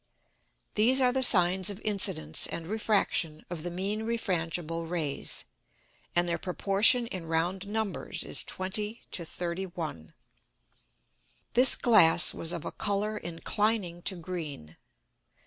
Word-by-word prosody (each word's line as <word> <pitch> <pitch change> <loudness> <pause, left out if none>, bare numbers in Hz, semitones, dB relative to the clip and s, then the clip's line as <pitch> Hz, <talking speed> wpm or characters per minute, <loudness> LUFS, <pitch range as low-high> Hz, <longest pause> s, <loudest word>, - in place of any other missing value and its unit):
These 240 +5 +4
are 250 -1 +4
the 265 - +1
Sines 185 -5 +5
of 200 -1 -6
Incidence 185 -7 0
and 165 - -5
Refraction 195 -6 0
of 170 -3 -5
the 175 - -4
mean 195 +5 -3
refrangible 170 -7 -2
Rays, 160 -5 -3 0.7
and 175 0 +2
their 170 -1 -1
Proportion 200 +7 +3
in 185 -7 -6
round 175 +4 -2
Numbers 215 -1 -3
is - - 0
20 210 +4 -3
to 175 - 0
31. 170 - -5 1.4
This 250 +2 +7
Glass 180 -8 +5
was 165 - -2
of 170 -3 -5
a - - -4
Colour 205 +1 -2
inclining 185 0 -2
to 190 - -1
green. 160 - -7
185 Hz, 125 wpm, -28 LUFS, 165-210 Hz, 1.4 s, This